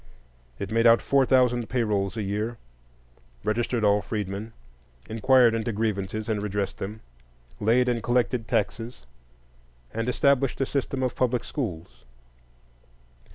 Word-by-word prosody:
It 100 - -5
made 115 +1 +4
out 115 0 +7
four 135 -2 +2
thousand 125 -3 +3
pay 125 -2 +1
rolls 100 -1 -1
a 110 - -1
year, 105 +4 -2 0.9
registered 115 +1 0
all 105 0 +4
freedmen, 105 +1 -4 0.6
inquired 120 +2 +4
into 115 +1 -1
grievances 105 -1 -2
and 110 -3 -1
redressed 100 -1 -3
them, 105 +3 -6 0.6
laid 120 +4 +3
and 120 -2 0
collected 120 -1 0
taxes, 115 - -2 0.9
and 115 +2 -2
established 135 +1 +2
a 135 - +2
system 135 -1 -2
of 125 - -1
public 125 -1 +1
schools. 90 - -5
115 Hz, 130 wpm, -26 LUFS, 105-125 Hz, 0.9 s, out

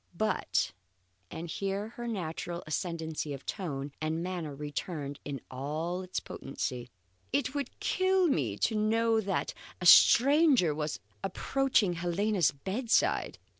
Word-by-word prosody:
But" 215 +1 0 0.6
and 165 +2 -6
here 195 +4 -3
her 240 +1 -7
natural 175 -4 -4
ascendancy 160 -2 -3
of 135 - -12
tone 145 -8 -4
and 160 +2 -1
manner 175 -5 -4
returned 145 0 -5
in 140 -3 -5
all 155 +7 -3
its 185 0 -3
potency, 125 -2 -5 0.4
"it 145 - 0
would 280 -3 -4
kill 375 0 +2
me 125 - +1
to 225 - +1
know 225 +1 +2
that 195 -2 -1 0.3
a 180 - -4
stranger 265 - +7
was 150 0 -3 0.2
approaching 225 0 +1
Helena's 175 +2 +1
bedside. 195 - 0
175 Hz, 125 wpm, -30 LUFS, 150-220 Hz, 0.6 s, stranger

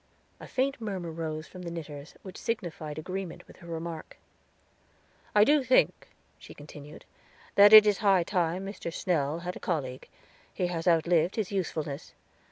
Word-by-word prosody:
A - - -10
faint 270 0 -1
murmur 190 -6 -4
rose 155 -1 -4
from 185 - -11
the 175 - -5
knitters, 155 -3 -8
which 190 -1 -9
signified 165 -9 -4
agreement 185 +2 -6
with - - -17
her 170 - -14
remark. 165 -1 -6 1.2
"I 210 - +7
do 290 +4 +4
think," 255 0 +2 0.3
she - - -13
continued, 150 0 -12 0.5
"that 205 +1 +8
it 215 -1 +11
is 205 -2 +2
high 195 -4 +4
time 180 +1 -1
Dr. 195 -3 -6
Snell 160 -4 -1
had 180 +1 -5
a - - -8
colleague; 135 -7 -3 0.4
he 180 - -2
has 175 -1 -3
outlived 170 +1 +3
his 215 -4 -2
usefulness. 160 -6 -3
175 Hz, 160 wpm, -29 LUFS, 160-195 Hz, 1.2 s, it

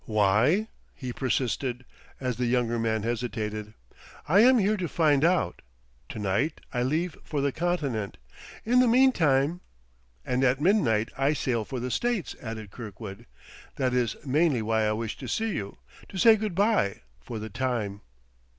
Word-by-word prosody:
"Why?" 110 - +3 0.3
he 125 -2 -6
persisted, 130 0 -1 0.3
as 125 -3 -2
the 125 -1 0
younger 120 -1 +1
man 110 -2 0
hesitated. 110 -2 -3 0.5
"I 180 +7 +5
am 250 +3 +7
here 210 0 +2
to 180 -3 -2
find 150 -4 +2
out. 175 +1 +1 0.5
To - - -7
night 105 +10 0
I 125 - 0
leave 155 +7 0
for 150 - -3
the 140 0 +1
Continent. 140 - -2 0.5
In 245 +3 +4
the 255 - +5
meantime 175 - +3 0.3
..." - - -38
"And 125 +1 0
at 130 +1 +3
midnight 140 - +2
I 140 +2 +3
sail 120 -7 -1
for 130 - -5
the 125 +1 -3
States," 235 - -1
added 110 -3 -7
Kirkwood. 105 -1 -9 0.5
"That 130 -2 0
is 120 -3 +1
mainly 140 -3 +2
why 110 0 +1
I 105 - +1
wished 110 0 -4
to 130 - -7
see 220 - -1
you 100 - -5 0.3
to 195 - -7
say 225 +4 +7
good 215 -4 -3
by, 200 - +2 0.2
for 120 - -7
the 110 0 -6
time." 110 -4 -2
125 Hz, 165 wpm, -27 LUFS, 110-165 Hz, 0.5 s, am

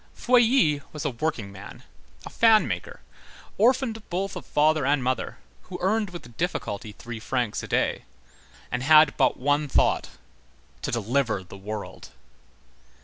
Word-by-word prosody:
Feuilly 240 - +3
was 150 0 -6
a 145 - 0
workingman, 110 -8 -5 0.4
a - - -7
fan 225 -2 +5
maker, - - -5 0.6
orphaned 235 0 +2
both 190 +2 -2
of - - -8
father 155 0 +2
and 140 0 +1
mother, 130 +1 -2 0.3
who 180 - -5
earned 210 +2 0
with 145 -10 -11
difficulty 110 - -3
three 120 +1 -8
francs 120 -1 -2
a - - -8
day, - - 0 0.7
and 125 - -2
had 155 +1 +6
but 130 -3 +2
one 145 +3 +1
thought, - - +1 0.7
to - - -3
deliver 120 -3 0
the 95 - -13
world. 100 -6 -7
145 Hz, 140 wpm, -25 LUFS, 120-185 Hz, 0.7 s, had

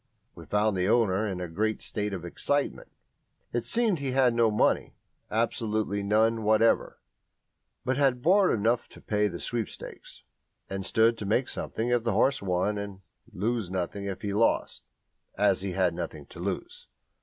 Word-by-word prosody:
We - - -12
found 105 0 +1
the 90 +1 +1
owner 110 -3 +2
in 95 -3 -3
a 90 - -3
great 105 +6 -1
state 105 -1 -2
of 90 -3 -5
excitement. 145 +11 -2 0.6
It 120 -1 -2
seemed 225 -7 +2
he 135 -2 -2
had 130 -2 +4
no 115 -1 +3
money 105 - +1 0.3
absolutely 110 -2 0
none 110 +3 +2
whatever 110 +1 +2 0.9
but 130 +1 0
had 130 -3 +2
borrowed 185 - +4
enough 115 +3 +1
to - - -15
pay 105 0 +1
the 85 -3 -6
sweepstakes, 115 -4 -6 0.4
and 95 0 -4
stood 115 +3 +3
to 100 - -4
make 125 +5 +2
something 115 +2 -3
if 120 -1 +2
the 115 -2 0
horse 135 +6 +2
won 100 +2 0
and 100 -1 -7 0.3
lose 110 0 -1
nothing 95 +2 -3
if 100 +1 -5
he 100 -1 -2
lost, 115 +3 +1 0.5
as 100 -2 +3
he 95 -1 -3
had 90 -2 +2
nothing 80 -4 -6
to - - -11
lose. 350 - -5
110 Hz, 165 wpm, -28 LUFS, 95-120 Hz, 0.9 s, had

